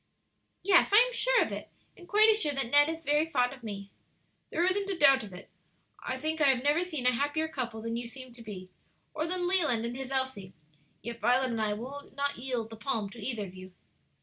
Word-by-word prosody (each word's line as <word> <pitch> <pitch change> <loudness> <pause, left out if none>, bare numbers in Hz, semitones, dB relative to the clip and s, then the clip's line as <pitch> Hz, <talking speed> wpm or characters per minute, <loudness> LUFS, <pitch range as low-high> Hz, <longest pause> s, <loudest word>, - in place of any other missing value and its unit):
"Yes, 380 -1 +4
I 410 - +7
am - - +5
sure - - +3
of - - -5
it, - - -6 0.3
and 350 - -15
quite 425 +1 +6
as 440 0 +4
sure 295 -1 +1
that 270 -3 -2
Ned 290 +1 +6
is 325 0 -5
very 295 +3 +2
fond 250 -5 +1
of 265 - -13
me." 200 -3 -7 0.6
"There 340 - +1
isn't 395 +2 0
a 385 - -1
doubt 275 -5 +6
of 205 - -10
it. 180 - -11 0.6
I - - -3
think 315 0 -3
I 290 - +5
have 255 -2 +2
never 295 +4 +3
seen 310 -8 -4
a 250 - +6
happier 290 +5 -1
couple 235 -7 -5
than 230 0 -3
you 235 0 -4
seem 255 0 -11
to 235 - -13
be, 190 -4 -9 0.4
or 310 +2 -2
than 355 0 0
Leland 310 -12 +2
and 235 +1 -4
his 265 0 -6
Elsie; 260 -8 -3 0.5
yet 235 +1 -6
Violet 250 +3 +2
and 225 -1 -2
I 210 -1 0
will 265 +6 -8
not 280 -2 -1
yield 240 -3 -3
the 225 - -9
palm 215 -3 -2
to 230 -2 -10
either 225 -3 -2
of 185 - -11
you." 185 0 -12
265 Hz, 235 wpm, -29 LUFS, 230-315 Hz, 0.6 s, I